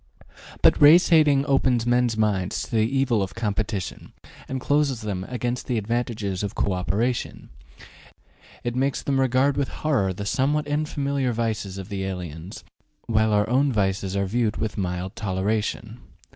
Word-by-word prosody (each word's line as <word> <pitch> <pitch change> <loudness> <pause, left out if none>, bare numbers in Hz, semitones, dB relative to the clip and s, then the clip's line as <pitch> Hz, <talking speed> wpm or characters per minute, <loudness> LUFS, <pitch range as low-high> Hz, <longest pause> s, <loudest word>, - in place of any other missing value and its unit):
But - - +5
race 160 +5 +7
hatred 150 -4 +4
opens 130 -4 +2
men's 120 -2 +2
minds 100 -4 0
to - - -10
the 115 - +2
evils 135 -5 +1
of 95 0 -4
competition 105 -4 -3 0.3
and 130 - -3
closes 140 -3 +1
them 100 -4 -3
against 125 0 -3
the 125 - 0
advantages 110 -3 -2
of 100 0 -4
co 100 - 0
operation; 110 +7 -2 1.1
it 120 0 -3
makes 135 +2 0
them 135 -1 0
regard 130 +2 +2
with 140 -2 0
horror 130 -12 0
the 100 +2 -6
somewhat 145 +7 0
unfamiliar 140 -3 -1
vices 110 -4 -2
of 95 -1 -7
the 100 -1 -3
aliens, 90 - -6 0.4
while 110 -1 +2
our 105 0 +2
own 135 +3 +2
vices 95 -3 -1
are 100 0 +1
viewed 110 +2 0
with 110 -1 -3
mild 90 -1 -3
toleration. 105 +3 -2
115 Hz, 155 wpm, -24 LUFS, 100-130 Hz, 1.1 s, race